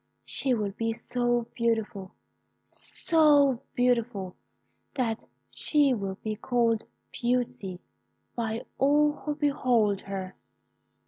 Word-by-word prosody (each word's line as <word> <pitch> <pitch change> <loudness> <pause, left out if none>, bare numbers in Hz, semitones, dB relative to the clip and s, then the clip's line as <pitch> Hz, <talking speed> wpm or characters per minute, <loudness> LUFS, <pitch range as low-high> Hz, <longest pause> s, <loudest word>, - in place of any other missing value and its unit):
She 260 -2 0
will 210 -3 -1
be 225 +3 -2
so 240 0 0
beautiful 225 -5 -1 0.5
so 290 -6 +3
beautiful, 235 -6 +1 0.6
that 230 -4 -1 0.3
she 290 -3 +2
will 195 -4 -3
be 215 -1 -2
called 230 -1 +1 0.3
Beauty 240 -7 -1 0.6
by 225 -1 -2
all 295 +2 +4
who 295 0 -4
behold 250 -9 +2
her.' 190 -1 -6
235 Hz, 95 wpm, -28 LUFS, 215-265 Hz, 0.6 s, all